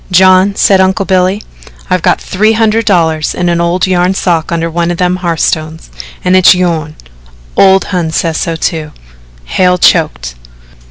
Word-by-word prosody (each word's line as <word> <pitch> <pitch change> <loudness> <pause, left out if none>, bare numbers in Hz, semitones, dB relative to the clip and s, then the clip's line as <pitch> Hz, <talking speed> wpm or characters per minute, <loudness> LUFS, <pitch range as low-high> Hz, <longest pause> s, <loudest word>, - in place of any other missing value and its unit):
"John," 185 +2 +4
said 195 -1 +3
Uncle 190 +2 0
Billy, 185 +2 0 0.4
"I've 185 -2 -1
got - - +1
three 215 +4 0
hundred 225 0 0
dollars 160 -6 0
in 175 -1 -1
a 170 0 0
old 175 +2 0
yarn 185 0 0
sock 170 -4 -1
under 165 0 -1
one 170 +1 -2
of 175 - -3
them 180 0 0
hearthstones 160 - -3 0.3
and 180 +1 +2
its 185 0 +5
yourn. 165 -4 -2 0.6
Ole 190 0 +4
Hon 175 -4 -2
says 160 0 -2
so 165 - -3
too." 160 -2 -4 0.5
Hale 180 - +1
choked. - - +1
180 Hz, 160 wpm, -10 LUFS, 165-190 Hz, 0.6 s, its